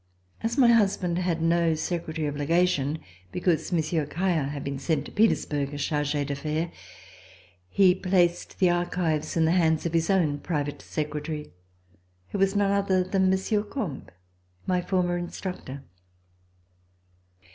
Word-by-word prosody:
As 230 +4 -2
my 250 -4 +6
husband 195 -6 +2
had 170 -3 -1
no 165 -1 +3
secretary 160 -1 -3
of 145 - -3
legation, 150 -1 +1 0.3
because 180 -1 0
Monsieur 160 -2 0
Caillard 165 -3 0
had 145 -1 -5
been 140 -1 -4
sent 160 +2 -1
to - - -9
Petersbourg 145 -10 +1
as 145 - -2
charge 150 -1 -1
d'affaires, 150 +3 -2 1.0
he 185 - +5
placed 180 -2 +1
the 180 -2 +4
archives 175 -3 -1
in 160 - +4
the 160 - +3
hands 160 -3 +2
of 170 - -2
his 165 -1 +1
own 165 -7 +2
private 145 -3 -3
secretary, 150 0 -4 0.8
who 200 - -3
was 195 +1 +2
none 200 -1 +2
other 195 -2 +2
than 190 0 +1
Monsieur 190 +3 +1
Combes, 205 - -5 0.6
my 180 -1 +1
former 175 -1 0
instructor. 175 -6 -6
170 Hz, 140 wpm, -26 LUFS, 150-185 Hz, 1.0 s, my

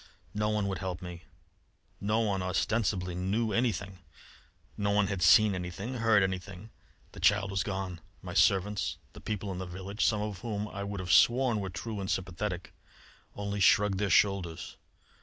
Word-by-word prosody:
No 105 0 0
one 105 -2 0
would 95 - -3
help 95 -2 -4
me. 90 -1 -8 0.7
No 105 +3 +1
one 100 -4 0
ostensibly 95 -1 0
knew 100 +6 -1
anything; 100 -4 -1 0.8
no 100 0 -1
one 100 0 +3
had 100 -2 -3
seen 105 +2 +6
anything, 90 +6 -5
heard 110 -3 +4
anything. 95 +2 -4 0.4
The - - -11
child 100 -1 +3
was 95 -1 0
gone! 95 -4 -4 0.2
My - - -6
servants, 100 +1 +2 0.2
the - - -12
people 105 -2 -3
in 90 - -5
the 95 - -5
village 95 +4 -4
some 105 -1 +2
of 105 -3 -5
whom 105 -3 -3
I 100 0 -5
could 100 -2 -4
have 90 -1 0
sworn 120 -2 +4
were 95 -2 -3
true 105 +4 -5
and 95 -1 -4
sympathetic 95 0 -3 0.6
only 100 0 -3
shrugged 100 +2 +4
their 105 -1 0
shoulders. 95 -3 +1
100 Hz, 170 wpm, -30 LUFS, 95-105 Hz, 0.8 s, seen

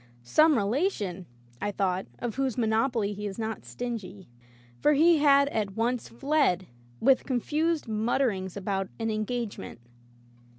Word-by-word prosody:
"Some 310 - +4
rela 245 - +2
tion,*' 185 - -6 0.3
I 205 - 0
thought, 190 -4 -1
"of 240 -2 -4
whose 265 -2 -1
monopoly 225 -2 +1
he 210 +1 -5
is 195 - -6
not 220 -2 -4
stingy/' 195 - -6 0.5
For 300 - +4
he 320 +2 +5
had 280 -1 +5
at 205 -6 -2
once 235 +2 -1
fled, 270 - +1 0.3
with 265 +1 +4
confused 300 +5 0
mutterings 215 -4 0
about 195 -1 -2
an 225 -1 -1
engage 215 +1 -3
ment. 95 - -9
225 Hz, 140 wpm, -28 LUFS, 200-270 Hz, 0.5 s, he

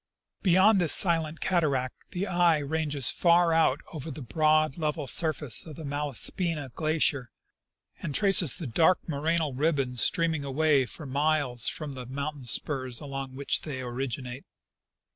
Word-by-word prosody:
Beyond 190 +2 +4
this 165 - +5
silent 165 -3 +3
cataract, 140 -8 -1
the 185 +1 -3
eye 175 -4 +3
ranges 145 -3 -1
far 170 -1 +3
out 160 -3 +2
over 155 0 -6
the 145 -1 -7
broad, 155 +2 +2
level 150 -1 -2
surface 150 -2 -2
of 155 -3 -10
the 160 - -8
Malaspina 145 - -4
glacier, 155 -5 0 0.7
and 145 -4 -4
traces 195 - +4
the 165 - -6
dark 160 +9 +3
morainal 155 0 -1
ribbons 135 -4 0
streaming 165 -5 +1
away 140 -1 +1
for 155 - -8
miles 140 -3 +1
from 155 -2 -6
the 130 -3 -7
mountain 140 +1 -5
spurs 130 0 0
among 135 -2 -7
which 140 +1 0
the}^ 140 -4 -6
originate. 125 +1 -5
150 Hz, 145 wpm, -27 LUFS, 135-165 Hz, 0.7 s, this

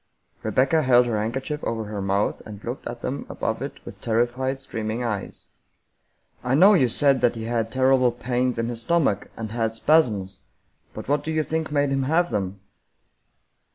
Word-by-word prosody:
Rebecca 130 +8 +2
held 125 -3 +5
her 110 -3 -1
handkerchief 135 +7 -3
over 115 -1 -2
her 105 -1 -5
mouth, 100 +1 0
and 105 -1 -10
looked 120 +3 -5
at 120 0 -7
them 140 - -4
above - - -3
it - - -7
with - - -10
terrified, 120 +4 0
streaming 115 -2 -4
eyes. 110 -4 -4 0.5
" - - -46 0.2
I 125 +1 +1
know 190 +8 +7
you 140 -10 +4
said 135 +2 +3
that 120 - +3
he 115 - -5
had 115 -1 -1
terrible 130 -1 +3
pains 125 +1 -1
in 115 0 -1
his 115 -1 -4
stom 170 +2 +3
ach, 100 - -7
and 110 -2 -5
had 115 -1 -1
spasms, 110 -10 +2 0.5
but - - -7
what 145 +1 +1
do 160 - -3
you 155 -1 +1
think 160 0 -3
made 145 -1 +1
him 135 0 +1
have 160 +6 +1
them 100 -2 -3
120 Hz, 190 wpm, -24 LUFS, 110-135 Hz, 0.5 s, know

